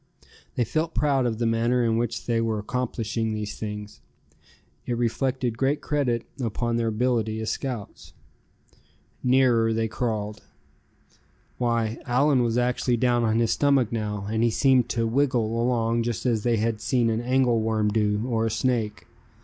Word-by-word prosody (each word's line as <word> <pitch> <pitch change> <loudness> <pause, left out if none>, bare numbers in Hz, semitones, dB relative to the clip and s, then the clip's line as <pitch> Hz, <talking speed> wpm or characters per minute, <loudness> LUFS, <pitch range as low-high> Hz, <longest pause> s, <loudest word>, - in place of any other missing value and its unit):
They 120 - +2
felt 160 +8 -2
proud 135 -4 +2
of 110 -2 -2
the 115 - -1
manner 115 +2 +2
in 115 -1 +2
which 115 0 -2
they 115 -1 +1
were 110 -1 0
accomplishing 115 0 -2
these 105 -1 -5
things. 105 -1 -6 0.9
It 120 - -1
reflected 120 0 -1
great 140 +2 +1
credit 135 -7 -1 0.2
upon 115 +1 -1
their 115 -1 0
ability 110 -1 0
as 110 - -2
scouts. 125 -7 -6 1.1
Nearer 125 -3 +3
they 110 0 0
crawled. 110 -3 -3 1.2
Why, 115 -2 0
Allan 135 +2 +3
was 120 -1 0
actually 125 0 +1
down 120 0 +2
on 110 -1 +2
his 115 -1 +2
stomach 140 -5 +2
now, 105 -3 -3
and 110 +1 -1
he 120 - +4
seemed 125 0 +3
to 115 -1 0
"wiggle" 115 -2 +1
along 115 -1 +1
just 115 0 -3
as 115 -4 +1
they 120 +1 +1
had 110 0 -1
seen 120 -1 +1
an 110 +1 -1
angle 125 -2 +2
worm 110 -1 +1
do, 105 0 0
or 115 -2 0
a - - 0
snake. 110 -2 -1
115 Hz, 160 wpm, -25 LUFS, 110-125 Hz, 1.2 s, he